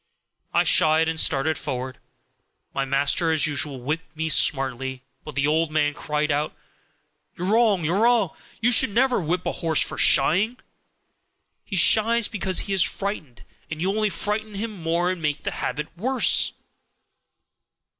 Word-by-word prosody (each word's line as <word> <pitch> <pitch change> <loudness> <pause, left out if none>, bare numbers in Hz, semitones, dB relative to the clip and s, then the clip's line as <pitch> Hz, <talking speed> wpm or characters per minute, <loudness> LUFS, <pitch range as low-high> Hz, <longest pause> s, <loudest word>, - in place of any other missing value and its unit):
I - - +2
shied 160 +1 +4
and 160 0 -1
started 155 +1 +1
forward. 130 -2 -5 0.7
My 135 - -2
master 140 +5 +1
as 155 -2 +3
usual 145 -2 -1
whipped 155 +5 -5
me 160 0 -2
smartly, 130 -3 +1 0.2
but - - -10
the 140 0 0
old 160 +2 +1
man 150 -1 0
cried 150 +1 -2
out, 145 +2 -2 0.8
'You're 180 +2 -3
wrong! 215 -7 +2
you're 175 +6 0
wrong! 230 -6 +2 0.3
You 240 +2 +3
should 230 - +4
never 245 +2 +1
whip 175 +2 -2
a - - -1
horse 160 -3 0
for - - -4
shying; 195 - +3 1.1
he - - -6
shies 225 +5 +4
because 190 -3 0
he 200 - -4
is 190 - +3
frightened, 170 -13 -2 0.3
and 160 - -6
you 185 +4 0
only 215 +1 0
frighten 210 +1 -2
him 220 +3 -4
more 175 -1 -1
and 185 -2 -6
make 150 -1 -2
the - - -3
habit 150 +2 -5
worse.' 250 +8 +1
165 Hz, 155 wpm, -23 LUFS, 150-200 Hz, 1.1 s, shied